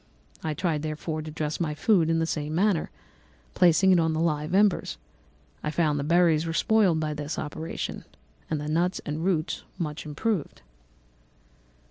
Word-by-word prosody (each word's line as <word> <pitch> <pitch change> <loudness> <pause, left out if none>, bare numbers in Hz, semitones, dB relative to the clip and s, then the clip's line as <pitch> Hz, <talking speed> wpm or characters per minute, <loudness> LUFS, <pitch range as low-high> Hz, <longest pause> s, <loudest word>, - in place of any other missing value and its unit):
I 155 -1 -2
tried, 165 -4 0
therefore, 155 +1 -3
to 155 - -7
dress 150 -1 -3
my 155 -3 -1
food 165 0 +3
in 165 - +2
the 165 - +1
same 155 -1 -3
manner, 190 -2 +2 0.6
placing 180 +2 +5
it 180 - +5
on 160 -1 +2
the 155 - -1
live 155 0 0
embers. 205 -2 +2 0.6
I 150 - -2
found 150 -2 +1
that 140 - -2
the - - -4
berries 170 -2 +4
were 165 - -2
spoiled 195 -3 +3
by 155 -1 -1
this 150 +1 -4
operation, 155 +2 -5 0.4
and 155 - -1
the 150 - -5
nuts 170 +4 +1
and 150 +2 -3
roots 175 -3 0
much 155 -3 -4
improved. 175 +3 -2
160 Hz, 170 wpm, -26 LUFS, 150-175 Hz, 0.6 s, placing